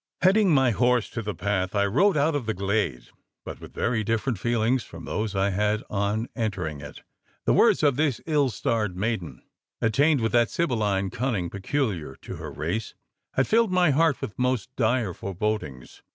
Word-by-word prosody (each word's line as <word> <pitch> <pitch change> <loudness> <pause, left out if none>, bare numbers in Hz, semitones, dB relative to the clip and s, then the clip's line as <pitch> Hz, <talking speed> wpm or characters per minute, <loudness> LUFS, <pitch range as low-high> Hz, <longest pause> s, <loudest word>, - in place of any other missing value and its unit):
Heading 195 +2 +5
my 135 -6 +4
horse 125 +1 +2
to 115 - -3
the 105 -2 -4
path, 95 0 -1
I 100 0 +3
rode 155 - +3
out 150 +3 +2
of 140 -6 -2
the 110 - -1
glade; 100 - -1 0.4
but - - -8
with - - -12
very 115 -2 0
different 115 +1 -1
feelings 120 +3 +1
from - - -11
those 105 -1 -3
I 95 +1 +1
had 105 +2 0
on 105 +3 -1
entering 90 - -3
it. 70 0 -10 0.4
The - - +3
words - - +4
of 140 -3 +3
this 145 -6 +1
ill 150 -4 +2
starred 105 -3 -1
maiden 90 - -3 0.4
attainted 140 +4 +2
with 110 - +1
that 120 -1 +3
sibylline 105 - 0
cunning 115 -8 -2
peculiar 100 - -2
to - - -7
her - - -6
race 85 +9 -3 0.4
had 130 - +3
filled 225 -2 +3
my 180 -3 +4
heart 155 0 +2
with 105 - -6
most 125 0 -1
dire 115 -5 +1
forebodings. 95 - -4
110 Hz, 180 wpm, -25 LUFS, 100-130 Hz, 0.4 s, Heading